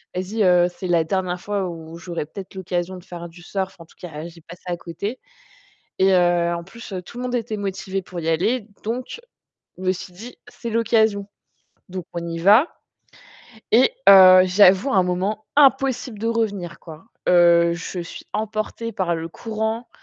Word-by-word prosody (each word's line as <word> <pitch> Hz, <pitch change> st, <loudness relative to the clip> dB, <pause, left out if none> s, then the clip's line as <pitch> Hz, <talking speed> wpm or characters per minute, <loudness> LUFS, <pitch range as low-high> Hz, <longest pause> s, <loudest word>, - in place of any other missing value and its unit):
«Vas-y, 200 Hz, +4 st, -1 dB
heu, 180 Hz, -1 st, +5 dB
c'est 185 Hz, -, -5 dB
la 170 Hz, -2 st, +3 dB
dernière 180 Hz, +1 st, -2 dB
fois 200 Hz, -2 st, -2 dB
où 165 Hz, 0 st, -9 dB
j'aurais 170 Hz, -3 st, -5 dB
peut-être 190 Hz, +5 st, -10 dB
l'occasion 185 Hz, 0 st, -3 dB
de 175 Hz, -, -13 dB
faire 170 Hz, -2 st, -8 dB
du 175 Hz, +1 st, -15 dB
surf, 190 Hz, +1 st, -4 dB
en 165 Hz, -, -11 dB
tout -, -, -24 dB
cas, 160 Hz, -2 st, -7 dB
j'ai 165 Hz, -1 st, -14 dB
pas 170 Hz, +2 st, -12 dB
ça 175 Hz, 0 st, -6 dB
à -, -, -4 dB
côté». 200 Hz, +9 st, -6 dB, 0.8 s
Et, 190 Hz, +1 st, +4 dB
heu, 175 Hz, -1 st, +3 dB
en 170 Hz, 0 st, -4 dB
plus, 210 Hz, +2 st, -11 dB
tout 240 Hz, -, -11 dB
le 250 Hz, -, -4 dB
monde 250 Hz, 0 st, -2 dB
était 225 Hz, -2 st, -3 dB
motivé 195 Hz, -1 st, -3 dB
pour 180 Hz, -1 st, -8 dB
y 160 Hz, -, -5 dB
aller, 210 Hz, +8 st, 0 dB, 0.2 s
donc 250 Hz, -, -4 dB, 0.6 s
je 185 Hz, -, -9 dB
me 185 Hz, -, +2 dB
suis 185 Hz, 0 st, -7 dB
dit: 230 Hz, +7 st, -10 dB
«C'est 235 Hz, -1 st, -7 dB
l'occasion». 220 Hz, -3 st, +2 dB, 0.6 s
Donc 180 Hz, -2 st, -6 dB
on 170 Hz, 0 st, -4 dB
y 165 Hz, 0 st, -4 dB
va, 210 Hz, -, +6 dB, 1.0 s
et 255 Hz, -, +5 dB, 0.2 s
heu, 185 Hz, -1 st, +9 dB
j'avoue, 190 Hz, +6 st, +5 dB
un 190 Hz, -, +4 dB
moment 190 Hz, +4 st, -2 dB
impossible 270 Hz, -4 st, +3 dB
de 225 Hz, -, -2 dB
revenir 205 Hz, -7 st, -2 dB
quoi. 160 Hz, -1 st, -12 dB, 0.2 s
Heu, 170 Hz, -1 st, +5 dB
je 175 Hz, +1 st, -6 dB
suis 170 Hz, -, -8 dB
emportée 215 Hz, +2 st, -3 dB
par 185 Hz, -4 st, -1 dB
le 165 Hz, 0 st, -5 dB
courant. 220 Hz, +3 st, -4 dB
190 Hz, 185 wpm, -22 LUFS, 175-220 Hz, 1.0 s, heu